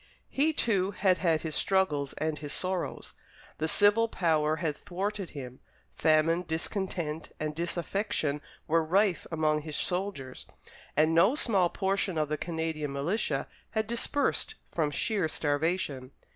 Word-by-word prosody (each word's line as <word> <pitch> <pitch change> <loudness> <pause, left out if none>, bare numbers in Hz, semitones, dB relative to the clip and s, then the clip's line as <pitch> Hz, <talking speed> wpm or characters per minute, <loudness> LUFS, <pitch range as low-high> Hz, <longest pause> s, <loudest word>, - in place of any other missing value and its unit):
He, 295 +4 +3
too, 200 -10 +2
had 190 -2 +2
had 165 -3 +2
his 160 -2 -4
struggles 150 -9 +1
and 155 -1 -2
his 145 -1 -5
sorrows. 185 -1 -3 0.5
The 160 - 0
civil 205 +6 +5
power 155 -6 +1
had 160 -2 -2
thwarted 200 +2 -4
him; 130 -2 -7 0.3
famine, 160 +2 +3
discontent, 165 -1 -2
and 155 0 -2
disaffection 170 -2 -1 0.3
were 165 +1 +3
rife 190 +3 +2
among 155 -1 +1
his 150 -1 -5
soldiers; 180 -9 -3 0.5
and 155 +2 +4
no 190 - +5
small 195 - +3
portion 195 -2 0
of 155 -1 0
the 155 - 0
Canadian 160 -3 -2
militia 150 +11 -1 0.3
had 220 - +2
dispersed 280 - 0 0.2
from 155 -3 +1
sheer 190 +4 +1
starvation. 145 -3 -1
165 Hz, 135 wpm, -29 LUFS, 155-195 Hz, 0.5 s, civil